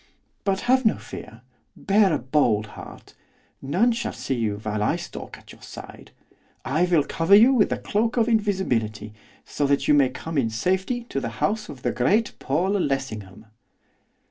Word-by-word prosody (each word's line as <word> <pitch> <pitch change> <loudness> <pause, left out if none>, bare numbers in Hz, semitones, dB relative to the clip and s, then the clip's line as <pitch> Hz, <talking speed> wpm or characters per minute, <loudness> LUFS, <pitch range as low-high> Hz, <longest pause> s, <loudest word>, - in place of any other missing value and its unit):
But 195 -1 0
have 260 +1 +3
no 220 - +3
fear; 115 +3 -10 0.3
bear 200 -1 +3
a 155 - +2
bold 125 -5 +1
heart. - - -12 0.5
None 185 - +2
shall 235 0 -3
see - - -3
you 110 -4 -1
while 105 0 -3
I 105 - +1
stalk - - -8
at - - -16
your - - -18
side. - - -11 0.6
I 155 +6 +2
will 170 -5 +3
cover 165 +6 +3
you 235 +6 +7
with 230 -6 +3
the - - -1
cloak 225 +4 -1
of 230 -1 +3
invisibility, 125 - -1 0.3
so 145 - -1
that 140 0 +1
you - - +5
may 140 -3 +4
come 155 +4 -4
in 115 -4 0
safety 190 - -1
to 135 - -2
the 120 - -4
house 215 +1 -1
of 130 -3 -10
the - - +1
great 205 - +1
Paul 170 +8 0
Lessingham. 110 - -3
150 Hz, 175 wpm, -24 LUFS, -, 0.6 s, you